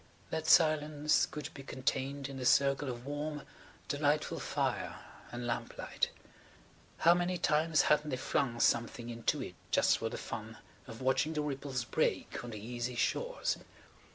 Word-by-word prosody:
That 160 0 -2
silence 155 -2 +4
could 150 -2 -7
be 140 - -9
contained 135 +1 -2
in 135 -1 -7
the 130 - -4
circle 140 +1 +4
of 120 0 -6
warm, 145 +1 -3 0.4
delightful 145 +1 +1
fire - - -1 0.4
and 120 0 -5
lamplight. 120 - -2 0.9
How 170 - +6
many 175 +1 0
times 155 -1 +3
hadn't 150 0 +3
they 130 - -1
flung 125 -2 0
something 120 0 +1
into 115 -1 -1
it - - -7 0.2
just - - +4
for - - -1
the - - -5
fun - - -6 0.3
of 115 +3 -8
watching 130 +4 +2
the 150 -1 -1
ripples 135 -3 -2
break - - -1
on 120 - -6
the 110 - -6
easy 120 +3 -4
shores. - - 0
140 Hz, 155 wpm, -33 LUFS, 125-150 Hz, 0.9 s, How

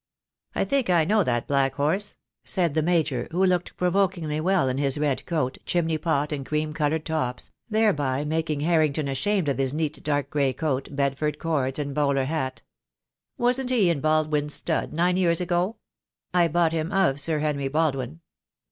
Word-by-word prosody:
"I - - +1
think 275 -6 0
I 170 -3 +4
know 210 +3 +3
that 120 -5 -1
black 135 -1 +1
horse," 165 +8 0 0.3
said 175 -6 +1
the 155 - +2
Major, 155 -7 0
who 180 +3 +1
looked 180 -2 0
provokingly 180 -4 0
well 185 -4 +2
in 130 +1 -1
his 140 0 +1
red 145 -3 0
coat, 150 -6 -1
chimney 165 -2 0
pot, 150 -2 0
and 145 -2 -3
cream 155 +2 -2
coloured 155 0 -1
tops, 130 -6 -2 0.2
thereby 150 - +1
making 155 -1 -1
Harrington 155 -2 +2
ashamed 175 +6 0
of 135 -2 0
his 135 +1 0
neat 155 -1 -2
dark 145 -1 -1
gray 140 -3 +1
coat, 135 -1 -2
Bedford 140 +1 -1
cords, 140 -5 -1
and 145 -2 -3
bowler 140 -2 +1
hat. 135 -3 -3 0.7
"Wasn't 250 +1 +1
he 215 -9 +3
in 150 -5 -2
Baldwin's 155 -1 +1
stud 160 - -1
nine 175 +3 +1
years 170 -3 +2
ago?" 180 +4 0 0.6
"I 175 -1 +4
bought 165 0 +2
him 160 +2 -2
of 190 -8 +2
Sir 155 +2 0
Henry 145 -2 -1
Baldwin." 145 0 -1
155 Hz, 175 wpm, -25 LUFS, 140-175 Hz, 0.7 s, I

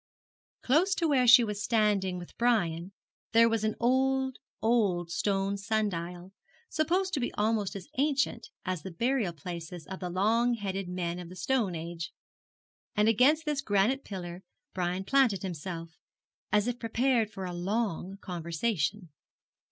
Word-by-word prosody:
Close 345 +9 +3
to 335 - +1
where 260 -4 +3
she 245 +1 +9
was 210 -2 -3
standing 205 -5 +2
with 175 -1 -10
Brian 190 -7 +1 0.4
there 230 0 +7
was 225 -2 0
an 215 0 0
old, 265 +1 +2 0.2
old 200 -7 +1
stone 195 +1 0
sundial, 190 -3 -2 0.4
supposed 365 +5 0
to 290 - +1
be 245 - -1
almost 210 -2 0
as 190 -2 -7
ancient 275 -5 +1 0.2
as 185 -3 -2
the 190 - -6
burial 230 +2 0
places 170 +1 -7
of 190 +5 -7
the 180 - -4
long 225 +7 +2
headed 195 -3 -3
men 175 -1 -3
of 175 -1 -8
the 180 - -10
stone 210 -2 0
age; 165 0 -5 0.8
and 210 +1 +3
against 280 +9 +4
this 295 -2 0
granite 220 +4 +2
pillar 180 -2 -6 0.3
Brian 180 0 -1
planted 235 -5 +3
himself, 165 -2 -6 0.5
as 210 +2 +3
if 245 0 -2
prepared 230 0 +1
for 190 -3 -6
a 180 - -4
long 195 0 -2
conversation. 175 +1 -2
205 Hz, 150 wpm, -29 LUFS, 180-240 Hz, 0.8 s, she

